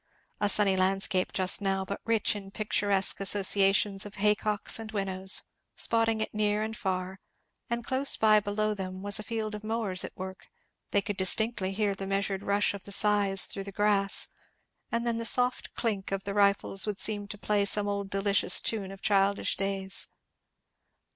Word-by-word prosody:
A 205 Hz, -, +1 dB
sunny 200 Hz, -1 st, +3 dB
landscape 190 Hz, 0 st, 0 dB
just 185 Hz, +1 st, 0 dB
now; 195 Hz, -1 st, -1 dB
but 200 Hz, +1 st, -6 dB
rich 225 Hz, -2 st, +1 dB
in 195 Hz, -1 st, -8 dB
picturesque 200 Hz, -1 st, +1 dB
associations 195 Hz, 0 st, +3 dB
of 205 Hz, -, -10 dB
hay 210 Hz, +1 st, +2 dB
cocks 210 Hz, +1 st, +1 dB
and 220 Hz, -1 st, -8 dB
winnows, 190 Hz, -2 st, +1 dB, 0.3 s
spotting 225 Hz, -1 st, +2 dB
it -, -, -4 dB
near 210 Hz, 0 st, 0 dB
and 220 Hz, 0 st, -5 dB
far; 190 Hz, -1 st, -4 dB, 0.5 s
and 235 Hz, 0 st, -3 dB
close 265 Hz, +2 st, +1 dB
by 215 Hz, -1 st, +5 dB
below 210 Hz, +1 st, -2 dB
them 190 Hz, -1 st, -7 dB
was 205 Hz, +1 st, +3 dB
a -, -, -6 dB
field 220 Hz, -1 st, -4 dB
of 210 Hz, 0 st, -8 dB
mowers 215 Hz, -4 st, -2 dB
at -, -, -9 dB
work; 190 Hz, 0 st, -9 dB, 0.4 s
they 200 Hz, -, +1 dB
could 205 Hz, -2 st, -5 dB
distinctly 190 Hz, +1 st, +2 dB
hear 205 Hz, 0 st, -1 dB
the 195 Hz, 0 st, -7 dB
measured 195 Hz, 0 st, -2 dB
rush 200 Hz, 0 st, 0 dB
of 200 Hz, -, -10 dB
the 200 Hz, -, -9 dB
scythes 200 Hz, -1 st, +4 dB
through 195 Hz, -, -4 dB
the 200 Hz, -, -8 dB
grass, 200 Hz, 0 st, +1 dB, 0.6 s
and 235 Hz, 0 st, -2 dB
then 230 Hz, -1 st, -1 dB
the -, -, -3 dB
soft 250 Hz, +2 st, +2 dB
clink 205 Hz, -5 st, -3 dB
of 195 Hz, 0 st, -3 dB
the 200 Hz, -, -5 dB
rifles 200 Hz, 0 st, +2 dB
would 210 Hz, -2 st, -3 dB
seem 205 Hz, -1 st, -1 dB
to 205 Hz, -, -8 dB
play 205 Hz, 0 st, 0 dB
some 205 Hz, +1 st, +1 dB
old 200 Hz, -1 st, -3 dB
delicious 195 Hz, 0 st, +2 dB
tune 205 Hz, -4 st, -2 dB
of 195 Hz, 0 st, -13 dB
childish 200 Hz, -1 st, +1 dB
days. 195 Hz, 0 st, -2 dB
200 Hz, 180 wpm, -28 LUFS, 195-215 Hz, 0.6 s, by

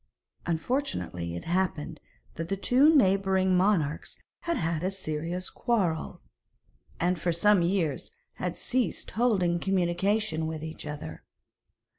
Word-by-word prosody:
Unfortunately 165 Hz, -, -2 dB
it 85 Hz, -, -5 dB
happened 175 Hz, -3 st, -1 dB, 0.3 s
that 165 Hz, 0 st, -5 dB
the 195 Hz, -, -1 dB
two 275 Hz, +10 st, +5 dB
neighbouring 190 Hz, -5 st, +3 dB
monarchs 180 Hz, -6 st, +1 dB, 0.3 s
had 340 Hz, 0 st, 0 dB
had 165 Hz, -1 st, -1 dB
a 185 Hz, -, +1 dB
serious 175 Hz, -1 st, -4 dB
quarrel, 180 Hz, -, -1 dB, 0.8 s
and 175 Hz, 0 st, +1 dB
for 175 Hz, +2 st, 0 dB
some 195 Hz, +3 st, +4 dB
years 170 Hz, -5 st, 0 dB, 0.3 s
had -, -, -3 dB
ceased 250 Hz, -1 st, -1 dB
holding 195 Hz, -7 st, +2 dB
communication 185 Hz, -1 st, +1 dB
with 160 Hz, -1 st, -5 dB
each 160 Hz, -1 st, -7 dB
other. 150 Hz, 0 st, -7 dB
180 Hz, 120 wpm, -28 LUFS, 160-200 Hz, 0.8 s, two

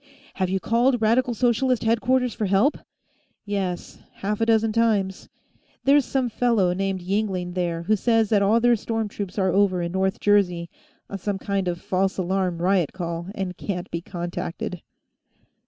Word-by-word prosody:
"Have 185 Hz, -2 st, -1 dB
you 190 Hz, +1 st, 0 dB
called 240 Hz, +5 st, +2 dB
Radical 235 Hz, +3 st, +2 dB
Socialist 245 Hz, +2 st, +1 dB
headquarters 245 Hz, +2 st, +2 dB
for 210 Hz, -, -2 dB
help?" 200 Hz, +10 st, +2 dB, 0.7 s
"Yes, 195 Hz, -4 st, -3 dB
half 210 Hz, +2 st, -3 dB
a 225 Hz, -, +2 dB
dozen 225 Hz, -1 st, +3 dB
times. 210 Hz, -5 st, 0 dB, 0.5 s
There's 280 Hz, 0 st, +4 dB
some 265 Hz, -2 st, 0 dB
fellow 225 Hz, -6 st, +2 dB
named 195 Hz, 0 st, -2 dB
Yingling 185 Hz, -2 st, -2 dB
there, 170 Hz, -2 st, -2 dB
who 215 Hz, +5 st, +2 dB
says 225 Hz, 0 st, +2 dB
that 210 Hz, -2 st, +3 dB
all 210 Hz, +4 st, +4 dB
their 240 Hz, 0 st, +4 dB
storm 225 Hz, 0 st, -3 dB
troops 200 Hz, -2 st, -6 dB
are 190 Hz, -2 st, +2 dB
over 195 Hz, -2 st, +3 dB
in 170 Hz, -, -3 dB
North 190 Hz, +1 st, 0 dB
Jersey, 180 Hz, -5 st, +2 dB, 0.4 s
on 200 Hz, -, -6 dB
some 200 Hz, +2 st, -2 dB
kind 195 Hz, -1 st, -2 dB
of 175 Hz, -1 st, -1 dB
a -, -, -18 dB
false 190 Hz, +1 st, 0 dB
alarm 185 Hz, -2 st, -1 dB
riot 185 Hz, -4 st, +2 dB
call, 170 Hz, -2 st, -4 dB
and 185 Hz, -2 st, -3 dB
can't 180 Hz, -2 st, -5 dB
be 170 Hz, -, -3 dB
contacted." 175 Hz, 0 st, -5 dB
195 Hz, 170 wpm, -24 LUFS, 180-225 Hz, 0.7 s, There's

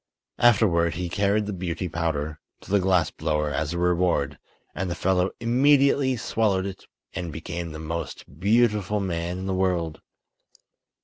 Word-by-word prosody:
Afterward 95 Hz, -8 st, +4 dB
he 90 Hz, 0 st, -3 dB
carried 100 Hz, +3 st, +1 dB
the 105 Hz, -, -4 dB
Beauty 90 Hz, 0 st, -3 dB
Powder 80 Hz, -3 st, -2 dB, 0.2 s
to -, -, -11 dB
the 100 Hz, -, +4 dB
glass 90 Hz, -5 st, +2 dB
blower 75 Hz, -1 st, -1 dB
as 75 Hz, +1 st, -1 dB
a 85 Hz, -, -3 dB
reward, 85 Hz, -5 st, +1 dB, 0.3 s
and 95 Hz, 0 st, -3 dB
the 85 Hz, -, -2 dB
fellow 95 Hz, 0 st, +1 dB
immediately 135 Hz, +2 st, +3 dB
swallowed 105 Hz, -4 st, 0 dB
it 100 Hz, -1 st, -7 dB, 0.3 s
and 85 Hz, -2 st, -4 dB
became 85 Hz, +1 st, -5 dB
the 80 Hz, -, -7 dB
most 80 Hz, -2 st, -6 dB
beautiful 105 Hz, 0 st, +2 dB
man 90 Hz, -2 st, -2 dB
in 95 Hz, -, -5 dB
the 95 Hz, -, -1 dB
world. 90 Hz, -4 st, -1 dB
90 Hz, 150 wpm, -25 LUFS, 85-100 Hz, 0.3 s, Afterward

